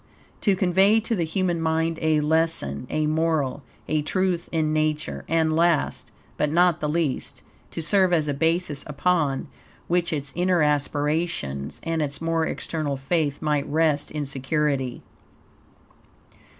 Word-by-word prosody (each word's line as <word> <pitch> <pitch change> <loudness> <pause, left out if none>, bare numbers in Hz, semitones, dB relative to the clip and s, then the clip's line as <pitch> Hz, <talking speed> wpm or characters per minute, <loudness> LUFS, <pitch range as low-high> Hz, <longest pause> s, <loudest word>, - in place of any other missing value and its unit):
to 200 -3 +3
convey 190 +3 +4
to 225 +1 -2
the 170 -4 0
human 175 0 -1
mind 160 0 0
a 155 -1 +2
lesson, 150 - 0
a 155 0 0
moral, 155 -3 0 0.3
a 155 -1 +1
truth 180 +2 -1
in 155 -2 0
Nature; 155 0 -1
and 160 -1 +2
last, 170 -2 +1 0.3
but 150 - +1
not 175 +1 +3
the 150 - -1
least, 155 -4 -2 0.3
to 165 - -4
serve 190 +2 +3
as 160 -3 +2
a 145 - 0
basis 160 0 0
upon 150 -2 0 0.4
which 175 0 +1
its 145 -3 -3
inner 180 -1 +2
aspirations 145 - -1
and 165 -1 -1
its 145 -1 -2
more 165 0 0
external 150 -4 -3
faith 145 +1 -1
might 150 -2 0
rest 155 -1 +1
in 150 -1 -3
security. 135 -1 -1
155 Hz, 140 wpm, -24 LUFS, 145-170 Hz, 0.4 s, convey